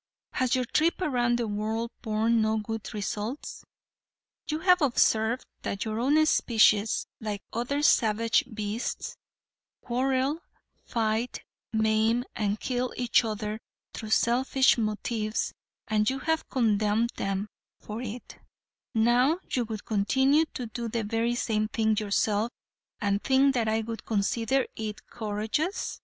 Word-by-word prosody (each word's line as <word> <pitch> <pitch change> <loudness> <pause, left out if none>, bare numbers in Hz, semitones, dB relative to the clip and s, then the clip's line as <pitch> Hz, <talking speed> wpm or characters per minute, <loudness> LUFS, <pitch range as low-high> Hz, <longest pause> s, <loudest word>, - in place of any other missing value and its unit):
Has 255 0 +1
your 255 -1 0
trip 315 +7 +1
around 245 -8 +1
the 235 -2 -1
world 220 +3 -2
borne 225 +1 +1
no 220 0 +1
good 220 0 -4
results? 210 +5 -4 0.9
You 305 - 0
have 360 -1 +5
observed 235 -3 +2 0.2
that 200 - -3
your 220 0 -2
own 295 +6 +4
species, 220 -6 +3
like 210 -3 -4
other 265 +6 -1
savage 225 -4 +3
beasts, 215 +2 -4 0.7
quarrel, 260 +4 0 0.5
fight, 225 +1 -1 0.3
maim 220 +2 +2
and 210 -1 -1
kill 250 -1 -2
each 245 -1 +3
other 215 -1 -3 0.3
through 220 - -6
selfish 255 +4 +3
motives, 215 0 -2 0.3
and 215 -1 +2
you 265 - -2
have 320 +3 -1
condemned 220 -1 +2
them 195 +1 -2 0.3
for 215 +2 -6
it; 240 0 -7 0.6
now 245 +7 +4
you 245 -2 +1
would 215 -2 -6
continue 265 +9 +3
to 250 - -3
do 230 +1 -5
the 230 0 -2
very 225 +3 0
same 215 -3 0
thing 220 0 +1
yourself 210 +1 +1 0.5
and 200 -1 0
think 270 +1 +4
that 235 -3 0
I 220 +1 +1
would 225 0 -6
consider 225 +5 +1
it 215 -2 -5
courageous. 220 - -3
225 Hz, 130 wpm, -28 LUFS, 215-250 Hz, 0.9 s, have